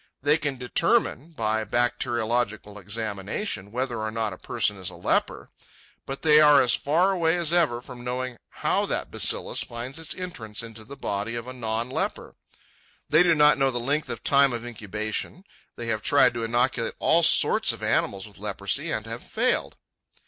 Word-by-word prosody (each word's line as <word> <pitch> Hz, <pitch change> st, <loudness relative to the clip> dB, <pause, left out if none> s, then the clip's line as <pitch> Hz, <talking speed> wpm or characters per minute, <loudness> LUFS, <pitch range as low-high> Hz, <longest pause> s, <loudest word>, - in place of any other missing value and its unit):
They 150 Hz, +2 st, +3 dB
can 145 Hz, -3 st, -3 dB
determine 165 Hz, -, +1 dB
by 110 Hz, -4 st, -1 dB
bacteriological 115 Hz, -2 st, -1 dB
examination 105 Hz, -, -4 dB
whether 125 Hz, 0 st, -3 dB
or 110 Hz, 0 st, -2 dB
not 110 Hz, -2 st, -3 dB
a -, -, -10 dB
person 105 Hz, -2 st, -1 dB
is 95 Hz, -, -1 dB
a -, -, -10 dB
leper; -, -, -1 dB, 0.6 s
but 135 Hz, 0 st, -6 dB
they 150 Hz, -1 st, +6 dB
are 150 Hz, -2 st, +7 dB
as 120 Hz, -1 st, +3 dB
far 165 Hz, +10 st, +2 dB
away 170 Hz, -3 st, +1 dB
as 170 Hz, -1 st, +2 dB
ever 150 Hz, -9 st, +2 dB
from 125 Hz, -1 st, -11 dB
knowing 125 Hz, 0 st, -4 dB, 0.3 s
how -, -, +2 dB
that -, -, -3 dB
bacillus -, -, +2 dB
finds 120 Hz, +6 st, -7 dB
its 165 Hz, -, -6 dB
entrance 115 Hz, -, -6 dB
into 115 Hz, -1 st, -10 dB
the 140 Hz, +5 st, -11 dB
body 105 Hz, 0 st, -3 dB
of 120 Hz, +1 st, -5 dB
a 130 Hz, -, -6 dB
non 115 Hz, -1 st, -3 dB
leper. 130 Hz, -, -4 dB, 0.7 s
They 155 Hz, +3 st, +6 dB
do 175 Hz, -2 st, +4 dB
not 150 Hz, -1 st, +5 dB
know 135 Hz, 0 st, +3 dB
the 120 Hz, -2 st, -2 dB
length 145 Hz, +6 st, -1 dB
of 120 Hz, -1 st, -5 dB
time 140 Hz, -2 st, +4 dB
of 120 Hz, 0 st, -4 dB
incubation. 110 Hz, -, -4 dB, 0.3 s
They 120 Hz, -, -6 dB
have 110 Hz, -1 st, -1 dB
tried 130 Hz, +1 st, +4 dB
to 120 Hz, -1 st, -4 dB
inoculate 120 Hz, +2 st, 0 dB
all -, -, +3 dB
sorts -, -, +5 dB
of -, -, -8 dB
animals 100 Hz, +1 st, 0 dB
with 100 Hz, -4 st, -16 dB
leprosy, -, -, -2 dB
and -, -, -3 dB
have -, -, -6 dB
failed. -, -, -1 dB
120 Hz, 180 wpm, -25 LUFS, 110-145 Hz, 0.7 s, are